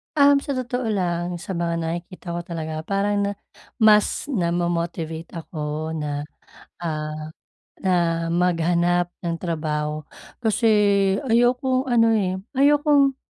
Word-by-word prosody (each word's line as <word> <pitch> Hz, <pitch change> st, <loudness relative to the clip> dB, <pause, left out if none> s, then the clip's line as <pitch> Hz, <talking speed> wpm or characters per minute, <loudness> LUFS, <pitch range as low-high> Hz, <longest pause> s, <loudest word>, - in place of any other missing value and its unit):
Um, 285 Hz, -1 st, +6 dB
sa 280 Hz, -1 st, -4 dB
totoo 250 Hz, -1 st, -2 dB
lang, 175 Hz, -4 st, -1 dB
sa 175 Hz, +3 st, -7 dB
mga 170 Hz, -2 st, -1 dB
nakikita 170 Hz, +2 st, -5 dB
ko 170 Hz, -, -2 dB
talaga 160 Hz, -2 st, -5 dB
parang 200 Hz, +1 st, +1 dB
na 200 Hz, 0 st, 0 dB, 0.4 s
mas 220 Hz, +5 st, +3 dB
namo-motivate 170 Hz, -3 st, -1 dB
ako 155 Hz, -1 st, -4 dB
na, 150 Hz, -2 st, -3 dB, 0.6 s
ah, 155 Hz, -2 st, -4 dB, 0.5 s
na 170 Hz, -3 st, +1 dB
maghanap 175 Hz, 0 st, +2 dB, 0.2 s
ng 165 Hz, -1 st, -2 dB
trabaho. 155 Hz, -3 st, -2 dB, 0.4 s
Kasi 225 Hz, +1 st, +2 dB, 0.6 s
ayokong 255 Hz, +2 st, +2 dB
ano 235 Hz, -2 st, +4 dB
eh, 185 Hz, -4 st, +1 dB, 0.2 s
ayokong 285 Hz, -1 st, +4 dB
175 Hz, 115 wpm, -23 LUFS, 165-225 Hz, 0.6 s, Um